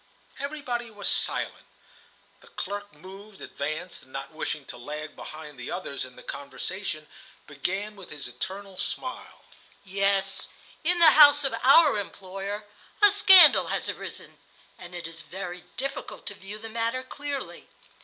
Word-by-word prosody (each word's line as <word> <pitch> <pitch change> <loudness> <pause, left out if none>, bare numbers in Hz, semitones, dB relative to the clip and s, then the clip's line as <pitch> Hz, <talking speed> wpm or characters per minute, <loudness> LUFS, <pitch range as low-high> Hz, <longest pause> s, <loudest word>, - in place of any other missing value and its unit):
Everybody 265 -5 -3
was 205 -2 -3
silent. - - 0 0.7
The - - -19
clerk 205 - -5
moved, 195 +5 -12
advanced, 155 +5 -5
and, 130 - -19
not 135 +3 -6
wishing 150 -2 -4
to - - -8
lag 150 +5 -6
behind 150 -3 -9
the 125 - -6
others 175 -6 -3
in 125 -1 -13
the - - -13
conversation, 155 +4 -5 0.4
began 190 +8 -2
with 195 -3 -12
his 145 -4 -6
eternal 190 +9 -6
smile: 255 +6 -4 0.4
"Yes, 195 0 0 0.3
in 350 +3 +2
the 330 -2 +8
house 290 -1 +8
of 270 - 0
our 275 -3 +7
employer, 195 +1 -6 0.3
a 415 -1 +7
scandal 380 -5 +8
has - - -2
arisen, - - -7 0.4
and 175 0 -10
it 175 -1 -5
is 165 0 -9
very 180 0 -7
difficult 275 +1 -4
to - - -2
view 200 +1 -8
the 225 +1 -8
matter 230 +3 -1
clearly. 285 +1 -5
195 Hz, 145 wpm, -27 LUFS, 165-255 Hz, 0.7 s, the